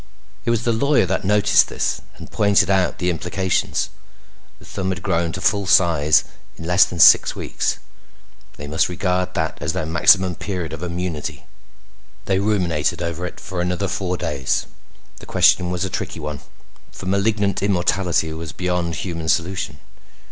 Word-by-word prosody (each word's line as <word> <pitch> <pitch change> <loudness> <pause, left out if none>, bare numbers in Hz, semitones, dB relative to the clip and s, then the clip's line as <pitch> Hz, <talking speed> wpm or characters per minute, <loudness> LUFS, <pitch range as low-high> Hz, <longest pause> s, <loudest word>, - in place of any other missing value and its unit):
It - - 0
was 115 -1 +1
the 120 - +1
lawyer 140 +1 +2
that 95 +1 -2
noticed 105 +1 +4
this - - -2 0.2
and - - -11
pointed 100 -2 +3
out 95 -2 +1
the 90 0 0
implications. 90 +1 -1 0.7
The - - -17
thumb 95 -1 -4
had 90 -2 -4
grown 85 0 0
to 95 - -5
full 100 -1 +1
size 80 -6 +4 0.3
in 80 - -8
less 90 +3 +5
than 90 - -8
six - - +7
weeks. - - -2 0.8
They 75 - -7
must 80 +4 0
regard 90 0 -1
that 80 0 -2
as - - -1
their - - -2
maximum 90 +3 +4
period 90 -5 -5
of 80 - -7
immunity. 90 -3 -4 0.8
They 95 -1 +1
ruminated 85 -5 0
over 85 +1 -3
it - - -10
for 90 -2 -5
another 90 +2 -1
four 90 -1 -2
days. 75 -7 -1 0.5
The - - -13
question 90 -1 +3
was 90 +1 -2
a - - -2
tricky 85 - -4
one, 75 -1 -5 0.5
for - - -10
malignant 100 +1 0
immortality 90 -4 0
was 80 -1 -7
beyond 90 -2 -2
human 85 -3 -4
solution. 85 -3 -1
90 Hz, 160 wpm, -21 LUFS, 85-95 Hz, 0.8 s, six